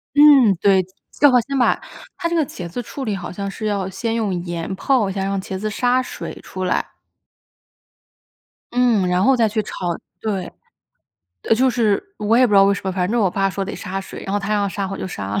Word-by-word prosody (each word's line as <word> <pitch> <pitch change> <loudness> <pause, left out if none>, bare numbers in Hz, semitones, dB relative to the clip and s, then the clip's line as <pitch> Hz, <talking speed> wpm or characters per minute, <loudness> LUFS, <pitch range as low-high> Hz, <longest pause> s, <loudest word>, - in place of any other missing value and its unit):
嗯， 280 -8 +7
对， 190 -2 +4 0.3
最 290 - +5
好 250 -2 +5
先 275 +3 -4
把 250 - +3 0.4
它 340 - -1
这 340 - -1
个 320 -3 +2
茄 175 -8 -7
子 170 +9 -5
处 240 +4 -7
理， 215 -5 -1
好 180 -2 -6
像 200 +2 -4
是 215 +2 -6
要 200 -3 -1
先 225 +4 -3
用 215 -4 -1
盐 170 +1 -4
泡 235 -1 +1
一 - - -4
下， 195 0 -2
让 195 0 -1
茄 190 0 -5
子 215 +2 -2
杀 245 +4 +1
水 255 - -7
出 185 - -6
来。 180 - +1 1.9
嗯， 240 -6 +2
然 180 +1 +2
后 270 +5 +5
再 230 -3 +3
去 215 +1 -1
炒。 - - -9 0.5
对， 195 -5 -3 1.0
就 260 +4 +3
是 235 - 0
我 210 +2 +2
也 255 +1 +6
不 215 - -3
知 - - +6
道 195 - +8
为 200 - +4
什 - - -5
么， 190 - 0
反 180 0 -1
正 235 +1 +1
我 195 -4 +2
爸 195 +1 0
说 195 +1 -3
得 205 - -5
杀 195 -1 -4
水， 195 - -9
然 195 - -4
后 205 - +2
他 205 +1 -3
要 205 -1 +1
杀 195 +1 -3
我 195 - -4
就 - - -5
杀 100 - -5
了。 - - +1
205 Hz, 250 characters per minute, -20 LUFS, 190-240 Hz, 1.9 s, 道